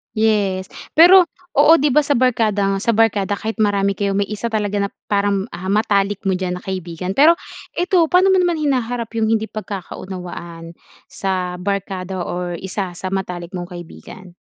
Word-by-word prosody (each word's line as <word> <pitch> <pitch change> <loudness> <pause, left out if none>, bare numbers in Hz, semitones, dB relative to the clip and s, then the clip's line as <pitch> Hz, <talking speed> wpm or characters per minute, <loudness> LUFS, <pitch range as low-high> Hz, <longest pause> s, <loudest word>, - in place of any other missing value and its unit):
Yes. 205 -4 +1 0.2
Per,o 355 +3 +8 0.3
oo 295 +2 +7
'di 290 +1 +2
ba - - +6
sa 285 - +2
barkada 215 -6 +1
sa - - +2
barkada 205 -2 +2
kahit 220 +3 -4
marami 200 -1 +1
kayo 200 -1 0
may 200 0 +1
isa 210 +2 -3
talaga 210 -2 -1
na - - -11 0.2
parang, 200 -1 +1
ah, 175 +2 -7
matalik 205 -1 +1
mo 195 -2 0
diyan 180 -1 -2
na - - -16
kaibigan. 185 -1 -5
Pero 315 +4 +7 0.4
ito 360 +1 +1
paano 365 +4 +4
mo 380 - +4
naman 350 -2 +1
hinaharap 245 -5 -1
'yong 225 -1 -1
hindi 220 0 -2
pagkakaunawaan 180 -4 -7 0.4
sa 185 -2 -2
barkada 190 -1 -3
or 175 0 -4
isa 190 -1 -4
sa 185 +2 -5
matalik 180 -3 -4
mong 180 0 -6
kaibigan? 175 +1 -11
200 Hz, 165 wpm, -19 LUFS, 185-225 Hz, 0.4 s, Per,o